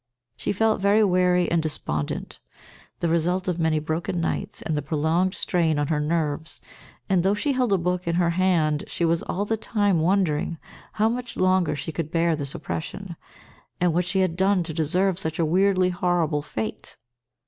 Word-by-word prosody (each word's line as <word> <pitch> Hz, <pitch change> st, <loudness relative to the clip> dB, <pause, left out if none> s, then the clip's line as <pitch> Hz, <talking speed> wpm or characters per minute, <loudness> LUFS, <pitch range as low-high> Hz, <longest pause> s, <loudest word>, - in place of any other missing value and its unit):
She -, -, -2 dB
felt 220 Hz, +1 st, +1 dB
very 205 Hz, +2 st, +4 dB
weary 180 Hz, -2 st, +3 dB
and 170 Hz, -1 st, +3 dB
despondent, 75 Hz, -, -4 dB, 0.6 s
the 170 Hz, -, +1 dB
result 175 Hz, +3 st, 0 dB
of 180 Hz, -2 st, -1 dB
many 160 Hz, -1 st, +2 dB
broken 160 Hz, +3 st, -2 dB
nights 165 Hz, -, -2 dB
and 160 Hz, -, -1 dB
the 150 Hz, -, -1 dB
prolonged 160 Hz, +6 st, 0 dB
strain 165 Hz, -4 st, +1 dB
on 145 Hz, -1 st, -1 dB
her 155 Hz, -2 st, +1 dB
nerves, 155 Hz, 0 st, -1 dB, 0.5 s
and, 190 Hz, -2 st, +3 dB
though 195 Hz, +3 st, +2 dB
she 280 Hz, +8 st, 0 dB
held 250 Hz, -4 st, +1 dB
a 195 Hz, -, +4 dB
book 180 Hz, 0 st, -2 dB
in 170 Hz, -, +1 dB
her 170 Hz, -1 st, +2 dB
hand 170 Hz, -4 st, +1 dB
she 170 Hz, -, -1 dB
was 165 Hz, 0 st, +2 dB
all 200 Hz, +3 st, -2 dB
the 225 Hz, +1 st, -1 dB
time 205 Hz, -5 st, +1 dB
wondering 170 Hz, -2 st, +1 dB, 0.4 s
how 215 Hz, +1 st, +2 dB
much 245 Hz, +2 st, -3 dB
longer 185 Hz, -4 st, +2 dB
she 145 Hz, +3 st, -4 dB
could 160 Hz, -1 st, -4 dB
bear 165 Hz, 0 st, +2 dB
this 145 Hz, -2 st, -4 dB
oppression, 175 Hz, +2 st, -5 dB, 0.6 s
and 175 Hz, -2 st, +2 dB
what 175 Hz, +1 st, +1 dB
she 190 Hz, +2 st, +1 dB
had 185 Hz, -3 st, 0 dB
done 190 Hz, 0 st, +2 dB
to 160 Hz, -1 st, -6 dB
deserve 180 Hz, +4 st, +1 dB
such 160 Hz, -3 st, -3 dB
a 165 Hz, -, +2 dB
weirdly 185 Hz, +2 st, +3 dB
horrible 175 Hz, -5 st, 0 dB
fate. 110 Hz, -7 st, -5 dB
175 Hz, 185 wpm, -24 LUFS, 160-190 Hz, 0.6 s, very